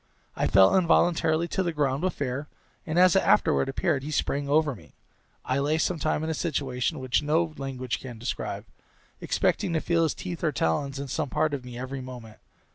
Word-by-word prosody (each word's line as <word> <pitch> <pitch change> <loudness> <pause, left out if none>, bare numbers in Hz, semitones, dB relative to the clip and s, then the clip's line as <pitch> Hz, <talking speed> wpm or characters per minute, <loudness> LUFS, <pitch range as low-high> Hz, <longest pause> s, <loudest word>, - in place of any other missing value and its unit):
I - - 0
fell 95 0 +6
involuntarily 170 -2 +3
to - - 0
the 175 -2 0
ground 140 -3 0
with 185 0 0
fear, 140 +1 -3 0.4
and, 160 +1 -2
as 180 0 +6
it 195 - +5
afterward 160 -8 +3
appeared, 145 0 0
he 145 - -6
sprang 140 -1 -1
over 150 0 +3
me. 110 - -16 0.5
I 130 +2 0
lay 150 +3 +1
some 165 +1 0
time 155 +1 0
in 160 - -2
a - - 0
situation 140 -2 -2
which 130 0 0
no 155 +2 +1
language 130 -3 -4
can 125 -3 -9
describe, 115 - -4 0.5
expecting 170 - 0
to 160 - +2
feel 170 +1 +1
his 160 - +1
teeth 175 -3 -6
or 155 - +2
talons 135 - -1
in 140 0 -5
some 145 +2 -2
part 150 +2 0
of 135 -3 -3
me 125 -1 -9
every 130 +1 -5
moment. 125 -4 -10
145 Hz, 200 wpm, -27 LUFS, 130-160 Hz, 0.5 s, fell